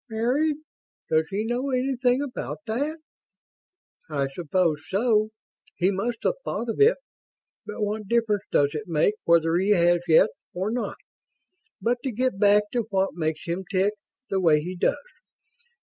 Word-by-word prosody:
"Married! 255 +8 +1 0.6
Does 160 0 +3
he 205 +3 -2
know 245 +4 -1
anything 255 0 +1
about 275 -3 -5
that?" 280 +8 -2 1.1
"I 140 -3 -1
suppose 165 -1 0
so. 215 +1 +2 0.5
He 180 +2 +2
must 225 +5 -3
have - - +2
thought 235 - -3
of - - -3
it. 450 +4 +6 0.7
But 210 0 -4
what 210 0 -3
difference 220 -3 +1
does 145 0 +3
it 150 +1 -5
make 165 +4 +2
whether 165 0 +4
he 195 +3 +3
has, 175 -1 +3
yet, 160 - +5 0.2
or 190 +4 -1
not? 245 0 -3 0.8
But 245 +1 0
to 265 - -1
get 245 -2 -1
back 205 0 +5
to 235 -3 -1
what 195 -1 0
makes 155 -2 -3
him 175 +2 -3
tick 195 +1 +1 0.4
the 195 - +1
way 160 -4 +5
he 180 +4 -5
does. 175 - +1
205 Hz, 155 wpm, -25 LUFS, 175-240 Hz, 1.1 s, it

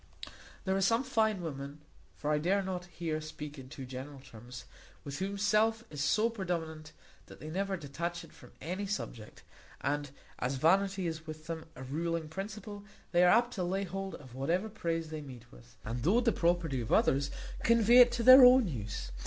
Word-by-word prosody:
There 190 0 +1
are 195 - 0
some 230 +6 +3
fine 220 -7 +1
women 140 -2 -6 0.4
(for 150 - -2
I 150 - +2
dare 195 +5 +1
not 185 -2 -4
here 165 -3 -4
speak 150 -1 -8
in 130 -1 -11
too 135 -2 -8
general 135 +2 -8
terms) 125 -1 -11 0.4
with 140 +1 -6
whom 195 +1 -3
self 215 +2 +2
is 145 -2 -3
so 215 +9 +3
predominant, 165 -7 -4 0.4
that - - -13
they 155 - -7
never 195 +2 -1
detach 170 +3 -5
it - - -15
from - - -16
any 185 +5 -4
subject; 120 - -6 0.4
and, 145 +1 -2 0.3
as 125 +2 -1
vanity 190 +6 +2
is 160 -1 -4
with 155 0 -8
them 160 0 -5
a 130 - -8
ruling 160 +4 -3
principle, 205 +3 -7 0.3
they 175 0 +4
are - - +6
apt 240 +4 +4
to 185 - -2
lay 190 +3 -1
hold 195 +1 -5
of 130 -4 -13
whatever 170 - -1
praise 165 -5 -3
they 155 -1 -5
meet 125 -5 -12
with; - - -17
and, 120 +2 -4
though 190 - +3
the 240 -1 +2
property 170 - 0
of 115 - -6
others, 140 +1 +3 0.3
convey 230 +1 +5
it 245 -1 +8
to 240 -1 -1
their 255 +2 +10
own 250 -2 +7
use. 105 - -5
170 Hz, 195 wpm, -31 LUFS, 140-200 Hz, 0.4 s, their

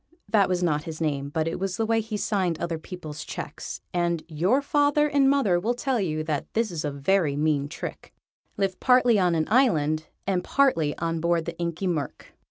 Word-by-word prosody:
_] - - -48
Tom - - -47
Tomb 335 - -32
that 205 -4 +3
was 180 -1 0
not 150 -3 +1
his 160 -1 -6
name, 140 -3 -1
but 160 +2 -1
it 165 - -3
was 190 -1 -2
the 225 - +1
way 225 0 +2
he 215 -1 -4
signed 190 -6 0
other 165 -2 -3
people's 155 -3 -8
cheques, - - -7
and 170 -2 0
your 175 - +2
father 290 +1 +2
and 280 -2 +3
mother 220 -11 +3
will 230 +7 -1
tell 255 0 -1
you 155 -5 -1
that 155 -3 -3
this 225 -2 +1
is 165 -3 -4
a 150 - -1
very 145 +2 +1
mean 145 -1 +1
trick 165 - -7 0.5
lived 195 -2 -1
partly 250 -4 +4
on 180 -2 +2
an 160 -1 0
island, 160 - +2 0.2
and 185 -2 0
partly 165 - +2
on 165 0 -2
board 170 0 +1
the 170 - -5
Inky 170 +2 -2
Murk. 155 -7 -3
175 Hz, 215 wpm, -26 LUFS, 155-220 Hz, 0.5 s, partly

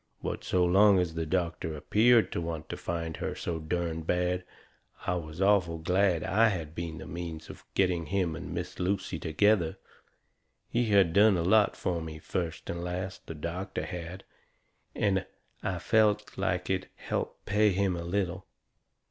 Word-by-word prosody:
But, - - -3
so 90 -1 +2
long 100 +3 +6
as 90 -3 0
the 80 -1 -3
doctor 85 -2 -1
appeared 115 +9 +4
to - - -2
want 80 -2 -5
to - - -3
find 85 -2 -4
her - - -3
so 85 -2 -3
derned 80 0 -2
bad, 90 +1 +1 0.6
I - - +1
was 80 -2 -5
awful 95 -4 +3
glad 90 +1 +2
I 110 +4 +4
had 80 -7 -3
been 85 -1 -5
the - - -8
means 85 -2 -6
of - - -14
getting 90 -4 +1
him 90 -3 0
and - - -7
Miss - - -5
Lucy 95 -2 -1
together. 85 +1 +2 0.9
He 120 0 +2
had 100 -5 +4
done 100 0 +6
a 85 - 0
lot 105 +4 +4
fur 85 -2 -2
me, 80 -1 -6
first 80 +1 -4
and 85 0 -4
last, 90 +2 -5
the 80 - -6
doctor 90 +5 -4
had, 90 +1 -6 0.7
and 95 -2 +1 0.4
I 95 -2 -2
felt 105 +3 +2
like - - -1
it 95 -1 -1
helped - - -4
pay 105 +1 +3
him 95 -1 +1
a 85 - -4
little. 90 0 -2
90 Hz, 170 wpm, -29 LUFS, 85-95 Hz, 0.9 s, long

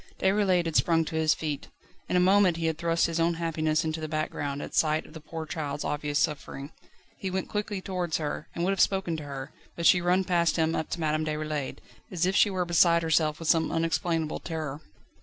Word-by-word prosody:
Déroulède 190 -2 +2
had 165 - -3
sprung 165 -1 +3
to 160 - -5
his 160 -1 +3
feet. 150 -3 -4 0.4
In - - 0
a - - +5
moment 185 -1 +4
he 165 - -2
had 160 -1 -1
thrust 170 0 +2
his 165 0 -1
own 165 +1 +2
happiness 160 -1 0
into 160 0 -2
the 155 - -3
background 150 -2 -3
at - - -7
sight 155 0 +2
of - - -15
the 160 - -8
poor 160 +1 -6
child's 150 -2 -4
obvious 145 0 -2
suffering. 145 -1 -2 0.5
He 190 - -3
went 190 +1 -3
quickly 210 -2 -3
towards 180 -4 -2
her, 150 -1 -4
and 170 - -2
would 190 - +2
have 195 - +1
spoken 190 -4 +1
to 155 - -6
her, 135 -1 -6 0.2
but 170 - -3
she 180 - +6
ran 180 +2 +2
past 170 -2 +2
him 160 0 +1
up 160 - -2
to - - -3
Madame 155 -1 0
Déroulède, 155 -2 -3 0.3
as 175 -2 0
if 190 +1 0
she 205 - +5
were 185 -2 -1
beside 170 0 +4
herself 155 -1 +2
with 165 - -6
some 160 0 +3
unexplainable 165 -1 0
terror. 155 -3 -5
165 Hz, 220 wpm, -28 LUFS, 155-175 Hz, 0.5 s, she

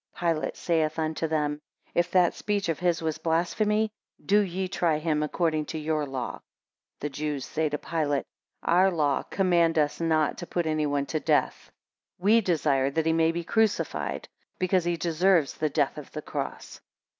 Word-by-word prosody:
15 170 -1 +1
Pilate 155 - -4
saith 160 -2 0
unto 160 0 -1
them, 150 -1 -1 0.3
If 175 +1 +1
that 180 -2 +4
speech 205 -3 -2
of 165 - -1
his 175 -2 +1
was 155 -1 -2
blasphemy, 210 +7 +1 0.3
do 205 +2 +4
ye 190 -1 -1
try 170 -4 +1
him 155 -1 0
according 155 0 0
to 160 - -5
your 155 -1 -1
law. 130 -2 -4
16 - - -40 0.6
The 150 - -2
Jews 145 -1 -3
say 155 -1 -1
to 150 - -2
Pilate, 150 -3 -1 0.4
Our 185 +3 +4
law 150 -6 +1
command 170 -4 +2
us 150 +1 +1
not 155 -2 +1
to 175 - -6
put 175 -1 -1
any 155 -1 0
one 145 -1 0
to 155 - -2
death. - - 0 0.5
We 215 +5 +4
desire 150 -8 +1
that 160 +3 -1
he 160 - +3
may 165 0 +3
be 170 +1 -3
crucified, 220 +3 0 0.3
because 185 -1 +1
he 175 -1 0
deserves 170 -1 +2
the 155 - -1
death 145 0 0
of 150 - -11
the 150 - -5
cross. - - -6
160 Hz, 180 wpm, -27 LUFS, 150-175 Hz, 0.6 s, that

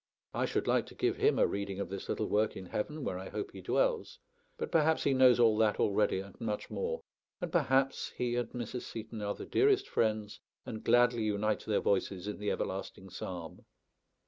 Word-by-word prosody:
I - - +1
should - - -1
like - - +2
to - - -12
give - - 0
him - - +3
a - - +5
reading 100 -1 -3
of 100 - -3
this 100 0 -6
little - - 0
work 105 +1 +1
in 95 - -7
heaven, 145 - -3
where 90 - -2
I 95 - -7
hope 395 -1 -4
he - - -9
dwells; - - 0 0.4
but - - -4
perhaps 160 -1 +3
he 140 - +3
knows 130 -2 +6
all 115 -2 +6
that 110 -2 +3
already, 100 -1 +2
and 100 0 -12
much 105 -2 -3
more; 480 +1 -2 0.4
and 175 -4 -4
perhaps 135 -4 +2
he 120 -1 0
and 120 -2 -1
Mrs. 120 0 -5
Seton 110 -1 -7
are 100 0 -2
the - - -7
dearest 405 -1 +3
friends, 110 -2 0 0.3
and 110 -1 -6
gladly 120 0 +4
unite 105 0 0
their 105 - +1
voices 95 -1 0
in 105 - -4
the 105 0 -1
everlasting 95 0 -4
psalm. 85 -3 -7
110 Hz, 200 wpm, -32 LUFS, 100-130 Hz, 0.4 s, knows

